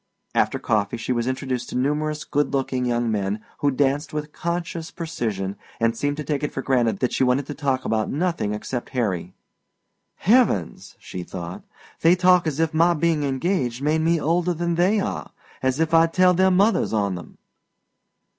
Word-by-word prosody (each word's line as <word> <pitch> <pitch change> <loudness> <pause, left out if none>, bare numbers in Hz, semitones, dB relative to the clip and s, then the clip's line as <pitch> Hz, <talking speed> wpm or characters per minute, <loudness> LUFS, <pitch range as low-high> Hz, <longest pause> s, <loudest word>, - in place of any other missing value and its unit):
After - - +2
coffee 105 +2 0
she 115 +2 -3
was 120 0 -1
introduced 130 -1 -2
to - - -3
numerous 150 +3 -1
good 145 -1 -1
looking 130 -2 -1
young 120 -1 0
men 100 0 -1 0.2
who 145 - +2
danced 140 +3 0
with 150 0 -4
conscious 170 -1 -3
precision 110 - -3 0.2
and 115 0 +2
seemed 145 +4 -1
to 150 - -3
take 145 -2 -2
it 150 - -2
for 135 - -4
granted 120 -6 +2
that 125 - 0
she - - +2
wanted 130 +2 +2
to 145 - -5
talk 135 -4 -1
about 110 -1 0
nothing 165 - -1
except 120 +4 -4
Harry. 95 -6 -1 0.8
"Heavens," 205 - +1
she 90 - -7
thought, 90 0 -7 0.4
"They 165 +2 +6
talk 180 -1 +4
as 155 -1 -2
if 165 -1 +1
my 170 +2 +4
being 165 -1 +1
engaged 135 -2 -1
made 155 +2 +2
me 165 +1 +2
older 175 +3 +1
than 170 +1 -1
they 185 +5 +3
are 195 - -4 0.3
as 130 +2 0
if 160 0 +1
I'd 165 0 +5
tell 185 0 +5
their 190 +2 +4
mothers 195 - +3
on 100 -3 +1
them!" 90 -2 -9
145 Hz, 185 wpm, -23 LUFS, 120-165 Hz, 0.8 s, They